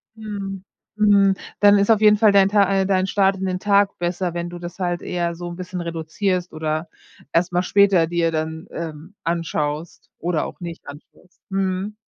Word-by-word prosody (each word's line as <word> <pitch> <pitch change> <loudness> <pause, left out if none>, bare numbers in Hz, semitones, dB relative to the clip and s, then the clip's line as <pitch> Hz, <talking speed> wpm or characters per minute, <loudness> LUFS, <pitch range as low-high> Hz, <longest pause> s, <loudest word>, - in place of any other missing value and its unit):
Mhm. 200 -3 -6 0.3
Mhm. 200 -2 +4 0.3
Dann 205 0 +7
ist 200 +1 +1
auf 220 -2 +4
jeden 210 -1 +6
Fall 215 -1 +5
dein 195 -1 +5
Ta 200 -2 +3
äh, 190 - 0
dein 190 -1 +1
Start 195 -1 +2
in 190 - -3
den 185 -1 -2
Tag 200 -1 +2
besser, 175 0 -2
wenn 170 0 -4
du 175 0 -8
das 175 0 -8
halt 175 -2 -2
eher 170 -1 -2
so 175 +1 -7
'n 175 - -7
bisschen 185 0 -6
reduzierst 175 +3 -2
oder 155 +1 -3 0.4
erstmal 175 +1 +1
später 195 -4 +4
dir 170 -1 0
dann, 160 0 -4
ähm, 165 +3 -7
anschaust 165 -2 -3
oder 170 -2 -1
auch - - -9
nicht 170 -1 -8
anschaust. 150 +5 -14
Mhm. 195 +1 -2
180 Hz, 185 wpm, -21 LUFS, 170-195 Hz, 0.4 s, Dann